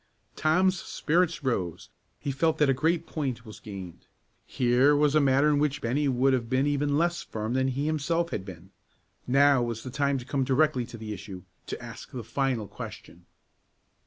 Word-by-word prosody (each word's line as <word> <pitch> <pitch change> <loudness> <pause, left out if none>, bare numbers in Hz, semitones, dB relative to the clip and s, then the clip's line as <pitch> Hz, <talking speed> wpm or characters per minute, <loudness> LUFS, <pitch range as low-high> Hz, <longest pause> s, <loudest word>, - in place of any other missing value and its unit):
Tom's 180 +4 +2
spirits 165 0 0
rose; 90 - -2 0.3
he 140 - -3
felt 160 +4 +1
that 150 -2 +3
a - - +3
great 160 +5 +1
point 130 -6 -4
was 110 - -11
gained. 95 -5 -9 0.4
Here 130 +4 +3
was 145 0 +3
a 155 - +5
matter 140 +1 +4
in 150 -1 +3
which 150 -1 0
Bennie 140 +5 0
would 135 +1 +3
have 120 -3 -1
been 130 +2 +2
even 145 0 +1
less 170 +2 +1
firm 110 +1 -4
than 130 0 +1
he 135 +2 -1
himself 165 +2 0
had 95 - -3
been. 95 -1 -11 0.6
Now 140 +1 +5
was 115 -2 -3
the 130 - -6
time 140 +1 +1
to 125 - -7
come 135 0 0
directly 130 -2 +2
to 115 - -9
the 110 -1 -6
issue, 95 -3 -9 0.2
to - - -5
ask - - -9
the 125 -3 -6
final 125 -3 -1
question. 85 -1 -10
135 Hz, 190 wpm, -27 LUFS, 115-150 Hz, 0.6 s, a